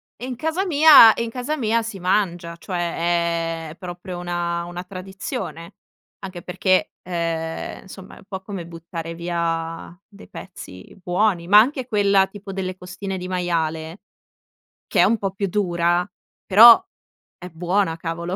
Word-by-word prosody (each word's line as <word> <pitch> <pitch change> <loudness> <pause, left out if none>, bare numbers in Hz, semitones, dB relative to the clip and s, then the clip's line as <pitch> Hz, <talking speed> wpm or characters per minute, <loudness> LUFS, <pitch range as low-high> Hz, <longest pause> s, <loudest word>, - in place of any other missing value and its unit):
e 245 - -8
in 255 -1 -5
casa 320 +9 -2
mia 300 - +8
e - - -4
in 235 - -3
casa 250 +6 -3
mia 230 -3 0
si 220 -4 -7
mangia, 175 -2 -1
cioè 170 -2 -2
è 155 - -11
proprio 180 0 -8
una 175 -1 -3
una 175 +1 -7
tradizione, 185 -1 -7 0.5
anche 185 -2 -7
perché, 185 +2 0
ehm, 165 -2 -4
insomma, 190 0 -12
è - - -16
un - - -16
po' 190 -2 -6
come 190 -3 -7
buttare 165 0 -8
via 165 -1 -3
dei 200 -1 -16
pezzi 95 - -11
buoni, 180 -1 0
ma 205 +3 +8
anche 260 +3 +1
quella 200 -3 +3
tipo 200 +1 -10
delle 185 -1 -4
costine 185 +1 -7
di 180 0 -6
maiale, 165 -2 -2 0.9
che - - +1
è - - +7
un 230 - +2
po' 195 -2 -3
più 200 0 -3
dura, 175 -2 0 0.4
però 225 +4 +9 0.6
è 180 0 -9
buona, 175 +1 -1
cavolo. 170 +2 -4
180 Hz, 155 wpm, -22 LUFS, 170-200 Hz, 0.9 s, però